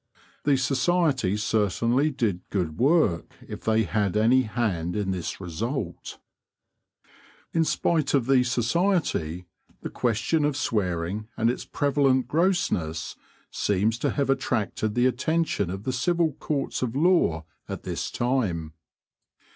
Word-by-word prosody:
The 140 -2 +4
society 135 - +1
certainly 115 - +1
did 115 -10 -1
good 85 -6 -2
work 135 - +2
if - - -7
they 110 0 +2
had 100 +2 0
any 120 +4 +4
hand 105 -7 -2
in 100 -2 -1
this 90 -3 -4
result. 95 - -4 1.4
In 165 - +3
spite 155 -2 +1
of 130 -4 +2
the 130 -1 +4
society, 120 - 0 0.4
the - - -5
question 120 +7 0
of 145 -1 0
swearing 100 -5 -1
and 115 +1 +3
its - - -6
prevalent 140 -3 +1
grossness 155 - 0 0.4
seems 105 +3 0
to 145 - 0
have 140 -1 0
attracted 110 -4 -1
the 120 - +3
attention 130 - 0
of 95 +2 -5
the 130 - -2
civil 165 +5 +1
courts 140 0 -3
of 125 -1 -2
law 145 - +2 0.2
at - - -5
this - - -3
time. 100 - -1
120 Hz, 130 wpm, -26 LUFS, 100-140 Hz, 1.4 s, The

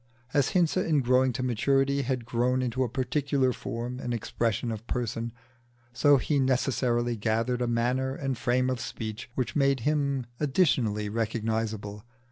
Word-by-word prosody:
As 145 -3 +2
Hinze 175 -1 +2
in 150 -3 +2
growing 130 +1 +3
to 125 +2 -3
maturity 135 +3 +2
had 130 -2 -2
grown 125 +2 +1
into 125 +1 0
a 125 - -2
particular 130 +1 0
form 120 +2 -5
and 120 -2 -2
expression 115 +1 -1
of 110 +1 -7
person, 120 -1 -2 0.6
so 145 +3 +5
he 145 +2 0
necessarily 125 -2 +1
gathered 115 +3 0
a 120 - +1
manner 125 +3 0
and 135 -2 -2
frame 125 +2 +1
of 130 - -2
speech 110 -1 -6
which 130 - -2
made 140 -3 +2
him 140 -2 0
additionally 130 - +1
recognisable. 110 -1 -2
125 Hz, 150 wpm, -28 LUFS, 115-135 Hz, 0.6 s, so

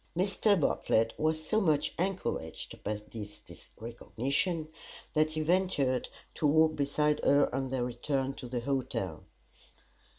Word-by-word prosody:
Mr. 200 +1 +3
Bartlett 115 -5 +2
was 155 0 0
so 215 +6 +2
much 155 -6 +2
encouraged 180 - -3
by 105 +1 -1 0.2
this 105 -2 -8 0.4
recognition 135 +8 -2 0.5
that 155 0 +2
he 155 - -1
ventured 155 -6 +1 0.2
to 150 - +1
walk 155 +1 +4
beside 150 +1 +1
her 140 -2 +4
on 135 0 -1
their 130 -1 -1
return 135 +2 -1
to 130 - -8
the 120 0 -2
hotel. 135 +1 -2
145 Hz, 130 wpm, -31 LUFS, 125-155 Hz, 0.5 s, walk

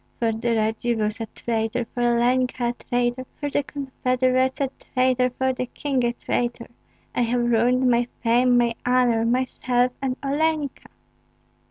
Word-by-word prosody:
"For 230 -1 +1
the 230 +1 -1
Radzivills 220 0 -1
a 225 - -3
traitor, 225 +2 -2
for 245 - -3
Olenka 240 +1 +2
a - - -2
traitor, 245 +1 -2
for 290 -1 -3
the 285 - +2
confederate's 260 -2 0
a 275 -2 0
traitor, 255 0 +1
for 260 +1 -1
the 255 0 -3
king 270 -1 -2
a 240 0 +1
traitor! 240 0 -2 0.5
I - - 0
have 240 +1 +1
ruined 250 +3 +3
my 240 0 +3 0.2
fame, 245 +1 +4
my 235 -1 +2
honor, 245 -2 +3
myself, 250 0 +1
and 260 -1 -1
Olenka!" 295 0 -1
245 Hz, 150 wpm, -23 LUFS, 235-255 Hz, 0.5 s, fame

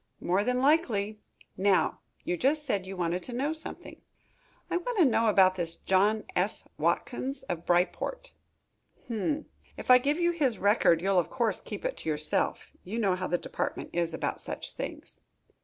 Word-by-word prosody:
"More 185 +3 +1
than 250 +2 +1
likely. 220 -9 +2 0.4
Now, 195 0 +2 0.2
you 175 - -1
just 295 - +1
said 200 -8 -1
you 190 0 -6
wanted 175 +1 -1
to 245 - -7
know 280 +6 0
something." 320 - -9 0.7
"I - - 0
want 470 +6 -3
to 355 - +6
know 230 -3 +3
about 190 -3 +5
this 170 -2 -3
John 205 +5 +2
S. - - -1
Watkins, 265 +2 -1
of 175 -10 -5
Bryport." 185 - 0 0.8
"Um! 290 +8 -1 0.3
If - - 0
I 250 - +9
give 290 +5 0
you 345 0 +3
his 275 -10 0
record, 190 -4 +3
you'll 195 -1 +3
of 170 - -1
course 235 -4 0
keep - - -7
it - - -2
to - - -4
yourself. 150 0 -1
You 205 +5 -5
know 200 -5 +2
how 185 0 -3
the 175 - +1
department - - -4
is 170 -1 0
about 160 - -3
such - - -5
things?" - - -7
215 Hz, 175 wpm, -29 LUFS, 185-275 Hz, 0.8 s, I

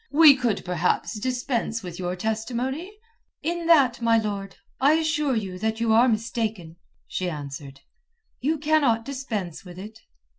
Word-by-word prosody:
We 300 -1 +8
could 240 -7 -1
perhaps 180 +4 0
dispense 245 -2 -2
with 175 -1 -7
your 180 0 -2
testimony." 240 - -3 0.5
"In 340 0 -2
that, 270 -8 +5
my 230 -1 +4
lord, 200 -3 -3 0.2
I 280 +3 +5
assure 300 -4 +1
you 190 -4 -3
that 220 +1 -1
you 230 -1 +2
are 235 +3 +6
mistaken," 220 -7 -2 0.3
she 185 -1 -3
answered. 140 -3 -7 0.6
"You 305 +5 0
cannot 290 -7 +2
dispense 225 - -4
with 180 -2 -11
it." 210 +4 -9
225 Hz, 145 wpm, -25 LUFS, 190-270 Hz, 0.6 s, We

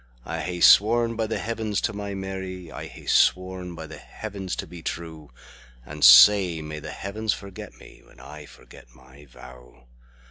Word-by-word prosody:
I 80 +1 -5
hae 90 +2 -5
sworn 115 +2 +5
by 110 -1 -2
the 110 - -3
Heavens 110 -2 -3
to 110 - -2
my 100 -1 -6
Mary,I 95 -2 -7
hae - - -14
sworn 90 -1 +1
by 80 - -8
the 80 - -11
Heavens 100 -4 -7
to - - -5
be 85 -1 -12
true; 80 -2 -7 0.6
And 75 +3 -8
sae 95 -5 +7
may 75 0 -7
the - - -9
Heavens 105 +2 -3
forget 100 -2 -10
me, - - -16
When - - -21
I 75 -1 -12
forget - - -17
my 65 +3 -18
vow! 65 -1 -16
90 Hz, 170 wpm, -24 LUFS, 75-100 Hz, 0.6 s, sae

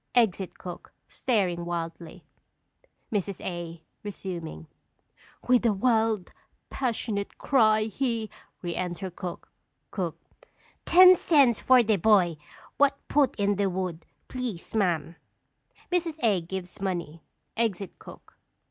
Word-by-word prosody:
[Exit 200 -6 +2
cook, 180 -1 -9
staring 185 -8 0
wildly. 170 -1 -5 0.9
Mrs. 200 -3 -2
A. 170 -2 -5 0.2
(resuming). 175 - -6 0.8
"With 250 -1 +4
a 230 -3 +3
wild, 220 -2 +1 0.4
passionate 225 -5 -2
cry, 220 -5 +3
he 230 0 -2 0.2
" - - -40
Re 175 -1 -3
enter 180 +1 -3
cook. 175 0 -7 0.4
Cook. - - -3 0.7
Ten 365 +1 +9
cents 280 -10 +4
for 255 -2 +5
de 215 -2 +2
boy 180 -4 +4 0.4
what 280 -1 +4
put 285 -3 +3
in 200 -1 +1
de 200 -1 +1
wood, 180 -3 -4 0.2
please, 245 -9 -5
ma'am! 175 -6 0 0.7
[_Mrs. 340 -3 0
A. 205 -6 +3
gives 185 +2 -7
money; 170 -4 -3 0.3
exit 205 -4 -2
cook. - - -14
200 Hz, 115 wpm, -27 LUFS, 175-235 Hz, 0.9 s, Ten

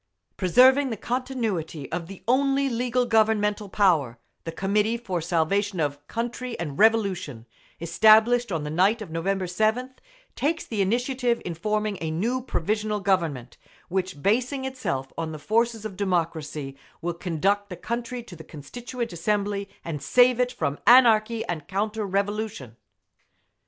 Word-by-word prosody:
Preserving 260 +9 +5
the 225 - -4
continuity 220 - -3
of 170 -2 -3
the 195 0 -11
only 275 +2 +2
legal 245 +1 0
Governmental 215 -2 +2
power, 160 - +2 0.3
the 165 - -3
Committee 205 +6 0
for 190 -8 -3
Salvation 180 +4 0
of 145 -1 -2
Country 240 +1 -4
and 150 -5 -5
Revolution, 190 - +2 0.3
established 220 +7 +4
on 160 -4 -2
the 150 - -4
night 200 +7 +2
of 175 - -11
November 185 +4 -1
7th, 220 +8 0 0.4
takes 325 +4 -1
the 215 -3 -2
initiative 245 +4 0
in 175 - -3
forming 210 +3 -2
a 160 - -2
new 225 +11 -1
Provisional 210 -1 -1
Government; 165 -11 -1 0.3
which, 185 -5 -3
basing 250 +6 +1
itself 195 - -4
on 160 -1 -3
the - - -6
forces 225 +6 0
of 205 -3 -5
democracy, 160 -7 -2 0.3
will 175 0 -1
conduct 195 +5 -1
the 180 - -7
country 235 +4 -4
to 200 -6 -12
the 160 - -11
Constituent 235 - -7
Assembly 200 +3 -1 0.2
and 150 -4 -4
save 245 - +4
it 250 0 +2
from 145 - -3
anarchy 230 -2 +5
and 155 -4 -5
counter 210 +2 -2
revolution. 200 - -3
205 Hz, 145 wpm, -25 LUFS, 170-235 Hz, 0.4 s, Preserving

